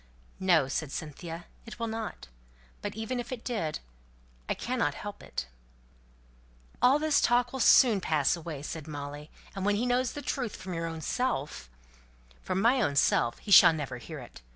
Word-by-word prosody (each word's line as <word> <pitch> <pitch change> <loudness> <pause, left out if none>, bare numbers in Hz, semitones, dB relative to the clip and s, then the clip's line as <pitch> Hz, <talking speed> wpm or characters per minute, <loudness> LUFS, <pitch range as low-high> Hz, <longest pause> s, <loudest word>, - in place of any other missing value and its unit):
"No!" 175 -7 +4
said 140 +1 -3
Cynthia, 165 +3 -6 0.2
"it 230 - -9
will 230 - -2
not. 225 -1 -5 0.5
But - - -4
even 225 +3 -3
if 240 +1 -6
it 245 -3 -5
did 190 -11 -2 0.7
I - - +1
cannot - - -1
help - - -7
it." - - -5 1.4
"All 260 +3 +6
this 305 -1 +2
talk 245 +1 +2
will 265 - -4
soon 230 -5 +6
pass 155 -4 +2
away!" 160 -4 -7
said 160 0 -6
Molly; 145 0 -7 0.3
"and 195 - -4
when 205 +1 +2
he 225 +4 0
knows 250 0 +1
the 290 - -6
truth 245 -5 -2
from 185 -1 -7
your 165 0 -2
own 165 -1 -6
self 150 - -2 0.4
" - - -29
"From 185 - -2
my 245 +5 +4
own 145 -10 0
self 120 -3 +3
he 205 - -8
shall 175 - +9
never 135 -5 -4
hear 155 +6 -8
it. 125 - -11
175 Hz, 180 wpm, -29 LUFS, 150-240 Hz, 1.4 s, shall